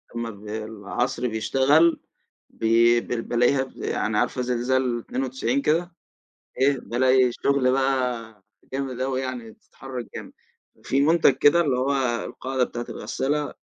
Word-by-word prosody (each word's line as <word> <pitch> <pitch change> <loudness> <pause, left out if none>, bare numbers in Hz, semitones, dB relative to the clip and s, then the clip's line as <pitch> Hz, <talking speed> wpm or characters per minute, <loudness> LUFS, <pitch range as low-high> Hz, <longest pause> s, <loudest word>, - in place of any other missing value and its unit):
أمّا 115 -1 -3
بالعصر 110 +4 -4
بيشتغل 135 +9 +3 0.5
بي 115 +1 +3
ب - - -14 0.2
بالاقيها 130 +3 +2
يعني 105 -1 -2
عارفة 125 - 0
زلزال 125 0 0
92 130 +1 -2
كده، 170 +5 +1 0.7
إيه 135 0 +3
بالاقي 130 +1 +2
شغل 140 -1 +1
بقى 125 -5 -1 0.3
جامد 135 -2 -4
أوي 130 0 -1
يعني 125 -3 -5
بتتحرك 125 +2 -9
جامد، - - -8 0.5
في 135 - 0
منتج 155 -1 +5
كده 145 +5 +5
اللي 140 -6 +1
هو 135 +2 +1 0.3
القاعدة 130 -1 -2
بتاعة 120 -1 -6
الغسالة 145 +2 -2
130 Hz, 125 wpm, -24 LUFS, 120-135 Hz, 0.7 s, منتج